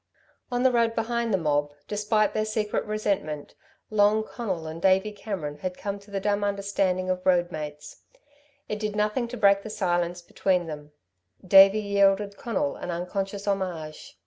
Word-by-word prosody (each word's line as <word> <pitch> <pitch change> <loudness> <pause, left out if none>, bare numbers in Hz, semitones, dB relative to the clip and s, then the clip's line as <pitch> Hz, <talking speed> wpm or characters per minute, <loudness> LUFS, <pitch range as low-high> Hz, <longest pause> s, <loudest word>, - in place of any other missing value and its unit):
On 245 0 0
the 260 - +5
road 230 -1 +2
behind 235 0 -1
the 195 - +3
mob, 145 -3 0
despite 210 0 +1
their 215 - 0
secret 215 -1 -1
resentment, 200 -8 -2 0.4
Long 215 +1 +4
Conal 195 -8 -4
and 160 +1 -7
Davey 190 +3 +3
Cameron 190 -8 -5
had 185 +2 -4
come 200 0 -4
to 200 +1 -19
the 200 -1 -2
dumb 205 +1 0
understanding 200 -2 0
of 180 0 -3
road 175 -1 +3
mates. 150 -1 -7 0.7
It 210 - -3
did 210 -1 -3
nothing 210 +4 0
to 245 +1 -7
break 200 -2 +4
the 220 - -8
silence 175 -4 -1
between 180 0 0
them. 150 -2 -8 0.6
Davey 195 +2 +8
yielded 200 0 +2
Conal 280 +7 -2
an - - -6
unconscious 195 +3 -3
homage. 180 -6 -3
200 Hz, 165 wpm, -26 LUFS, 175-210 Hz, 0.7 s, Davey